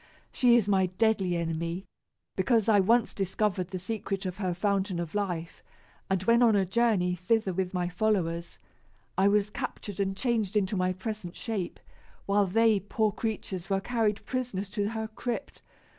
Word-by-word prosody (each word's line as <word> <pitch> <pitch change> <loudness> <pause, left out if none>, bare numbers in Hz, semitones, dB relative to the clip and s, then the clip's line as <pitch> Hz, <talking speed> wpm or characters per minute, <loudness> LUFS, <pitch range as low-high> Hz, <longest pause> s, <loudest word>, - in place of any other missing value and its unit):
She 245 -2 +4
is 225 -4 +3
my 190 -2 +3
deadly 190 -1 +1
enemy, 170 +2 -3 0.5
because 225 +2 +2
I 210 -2 +5
once 230 +4 +3
discovered 190 -1 -1
the 185 0 -5
secret 195 0 -3
of 185 0 -4
her 185 -4 -1
fountain 195 -1 0
of 170 -2 -4
life; 180 -5 -3 0.5
and, 190 -1 +1
when 235 +4 +4
on 230 -3 +5
a 195 -1 +3
journey 190 -3 +2
thither 190 +2 0
with 185 0 -1
my 180 -1 -1
followers, 175 -3 -1 0.6
I 190 +1 +4
was 205 0 +2
captured 205 -1 -5
and 195 -1 -1
changed 220 -5 0
into 200 0 +1
my 185 -1 +1
present 185 -1 -5
shape, 210 -7 -4 0.5
while 200 0 +3
they, 220 +2 +4
poor 210 +2 0
creatures, 205 -4 -4
were 195 -1 +2
carried 220 -1 0
prisoners 235 -7 -3
to 205 -1 -1
her 220 -1 -3
crypt. 240 +4 -5
200 Hz, 165 wpm, -29 LUFS, 185-220 Hz, 0.6 s, I